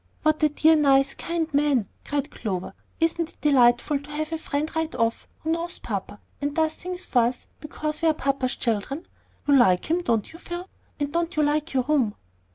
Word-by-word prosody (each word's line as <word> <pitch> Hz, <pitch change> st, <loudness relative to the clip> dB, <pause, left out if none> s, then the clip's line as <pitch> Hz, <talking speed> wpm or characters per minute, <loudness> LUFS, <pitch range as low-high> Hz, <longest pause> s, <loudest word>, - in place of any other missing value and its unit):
"What 310 Hz, 0 st, +2 dB
a 305 Hz, -, +5 dB
dear, 315 Hz, +2 st, +5 dB
nice, 275 Hz, -2 st, +4 dB
kind 335 Hz, -1 st, -2 dB
man!" 280 Hz, -7 st, +2 dB, 0.2 s
cried 285 Hz, -1 st, -2 dB
Clover. 190 Hz, -5 st, -4 dB, 0.3 s
"Isn't 330 Hz, 0 st, +1 dB
it -, -, -21 dB
delightful 265 Hz, 0 st, +4 dB
to 285 Hz, +1 st, -14 dB
have 305 Hz, +1 st, -3 dB
a 325 Hz, -, -2 dB
friend 300 Hz, +1 st, -3 dB
right 320 Hz, 0 st, -1 dB
off 230 Hz, -1 st, 0 dB
who 320 Hz, -, -1 dB
knows 335 Hz, +1 st, -2 dB
papa, 205 Hz, -1 st, -5 dB, 0.2 s
and 285 Hz, 0 st, -2 dB
does 315 Hz, -1 st, +2 dB
things 360 Hz, +1 st, -5 dB
for 250 Hz, -, +2 dB
us 245 Hz, +1 st, -4 dB
because 305 Hz, +1 st, -4 dB
we 330 Hz, -, +3 dB
are 315 Hz, -, +5 dB
papa's 270 Hz, -3 st, 0 dB
children? 240 Hz, -, -2 dB, 0.4 s
You 285 Hz, -, +6 dB
like 240 Hz, -, +4 dB
him, 350 Hz, +2 st, +2 dB
don't 230 Hz, -8 st, 0 dB
you, 330 Hz, -, -11 dB
Phil; 350 Hz, +1 st, -6 dB, 0.3 s
and 290 Hz, 0 st, -2 dB
don't 340 Hz, +1 st, -1 dB
you 305 Hz, -, +3 dB
like 300 Hz, +2 st, 0 dB
your 260 Hz, -, +3 dB
room?" 260 Hz, -7 st, +1 dB
295 Hz, 200 wpm, -25 LUFS, 260-320 Hz, 0.4 s, You